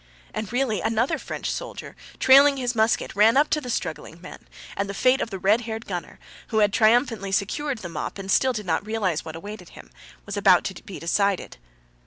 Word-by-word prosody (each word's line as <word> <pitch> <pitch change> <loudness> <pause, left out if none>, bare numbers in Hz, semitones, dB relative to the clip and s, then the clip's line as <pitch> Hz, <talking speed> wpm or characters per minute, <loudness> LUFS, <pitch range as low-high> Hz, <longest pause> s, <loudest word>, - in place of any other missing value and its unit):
And 215 -2 -5
really 245 -6 0
another 225 +3 0
French - - -4
soldier, - - -7 0.2
trailing 275 +2 +6
his 250 -2 -1
musket, 220 -3 0
ran 220 +5 +5
up 295 +2 +3
to 305 - +1
the 250 - -7
struggling 165 -5 -4
men, 180 - -12 0.3
and 200 0 -2
the 200 - -5
fate 255 +5 +3
of - - -2
the 195 - -5
red 205 +5 +2
haired 225 0 -6
gunner, 180 -3 -6 0.3
who 220 - -2
had 205 -2 +3
triumphantly 220 -3 +2
secured 255 +8 -1
the 195 - -7
mop 170 - -5
and 195 0 -5
still 260 +6 +3
did 215 -4 -5
not 160 0 0
realize 205 -7 -1
what 160 -1 -8
awaited 185 +1 -9
him, - - -14 0.3
was 200 - -5
about 195 -3 +4
to 190 - -6
be 195 - -9
decided. 200 +3 -1
215 Hz, 205 wpm, -24 LUFS, 195-240 Hz, 0.3 s, trailing